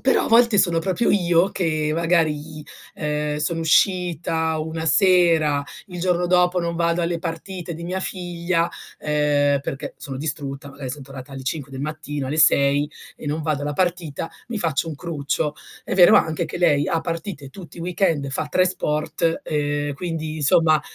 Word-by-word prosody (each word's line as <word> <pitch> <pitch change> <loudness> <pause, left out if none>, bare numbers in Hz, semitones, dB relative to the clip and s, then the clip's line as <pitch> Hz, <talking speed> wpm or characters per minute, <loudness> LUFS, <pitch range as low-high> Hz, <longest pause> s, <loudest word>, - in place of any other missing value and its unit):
però 265 - +2
a - - -3
volte 230 -2 +4
sono 170 -3 +4
proprio 190 +7 0
io 175 -2 +3
che 155 -5 -1
magari, 155 -2 0 0.3
ehm, 150 -1 -2
sono 160 +2 0
uscita 165 -1 +1
una 160 +1 -4
sera, 165 -5 +5 0.2
il 180 -3 -9
giorno 175 0 0
dopo 180 0 +3
non 170 0 -3
vado 170 +1 +1
alle 170 0 -1
partite 175 +1 -6
di 165 - -9
mia 180 +2 -3
figlia, 175 -2 -1 0.3
ehm, 145 -1 +1
perché 135 0 -6
sono 135 -2 -6
distrutta, 145 -1 -4
magari 140 -2 -7
son 140 +2 -7
tornata 135 0 -11
alle 135 -1 -7
5 140 +1 -4
del 135 - -6
mattino, 150 -2 -4
alle 150 - -3
6 145 -1 +5 0.3
e - - -10
non 150 +2 -2
vado 150 -2 -2
alla 145 - -2
partita, 170 -2 -2 0.2
mi 235 -2 -3
faccio 165 -4 0
un 160 - -5
cruccio. 150 -2 -3 0.3
È - - -4
vero 180 -2 +7
anche 160 +1 +1
che 160 - -6
lei 145 -5 +3
ha 165 - 0
partite 165 -3 -5
tutti 175 +4 -12
i - - -7
weekend, 170 -5 0
fa 135 +3 -1
3 185 +5 +2
sport, 160 -1 0
ehm, 145 -1 -2
quindi, 160 0 -4
insomma, 155 +1 +4
160 Hz, 175 wpm, -22 LUFS, 145-175 Hz, 0.3 s, vero